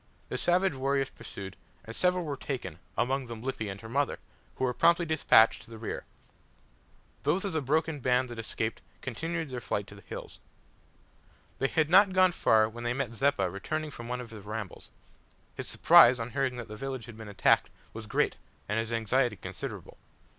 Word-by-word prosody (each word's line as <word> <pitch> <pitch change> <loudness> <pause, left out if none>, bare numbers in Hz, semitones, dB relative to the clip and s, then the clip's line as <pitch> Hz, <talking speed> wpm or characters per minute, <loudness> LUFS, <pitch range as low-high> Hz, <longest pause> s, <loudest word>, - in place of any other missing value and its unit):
The - - -2
savage 180 0 +2
warriors 135 0 0
pursued, 95 -2 -9 0.3
and 115 - -8
several 180 -1 +1
were 145 -2 -3
taken, 120 - -5 0.2
among 130 +1 0
them 115 -1 -7
Lippy 130 -5 -3
and 95 0 -6
her 110 - -9
mother, 140 +5 0 0.4
who - - -4
were 125 -1 +2
promptly 170 +6 +4
despatched 150 -8 +5
to - - -15
the 115 - -9
rear. 110 - -5 1.2
Those 170 +8 +1
of 195 - -2
the 160 - 0
broken 155 +2 0
band 125 0 +2
that 120 -1 -7
escaped 110 0 -3 0.2
continued 160 +4 -3
their 125 -1 -4
flight 105 -3 -2
to 100 - -13
the 100 - -13
hills. - - -9 1.2
They 135 - +2
had 155 +2 +1
not 195 +1 +7
gone 185 -1 +5
far 110 -9 +4
when 120 +2 -8
they 120 +1 0
met 135 -4 -2
Zeppa 135 -5 +2
returning 150 - -4
from 120 -3 -8
one 125 +1 -3
of 120 - -10
his 105 -3 -10
rambles. 105 -2 -6 0.6
His - - -6
surprise 125 +1 +7
on 115 +1 -4
hearing 130 +1 0
that 120 -2 -6
the 105 - -8
village 130 0 -5
had 120 - -10
been 110 -2 -8
attacked 100 - +3 0.2
was 110 -1 -8
great - - +1 0.3
and 105 +2 0
his 115 +1 -3
anxiety 115 +1 +1
considerable. 85 - -7
125 Hz, 190 wpm, -29 LUFS, 110-145 Hz, 1.2 s, not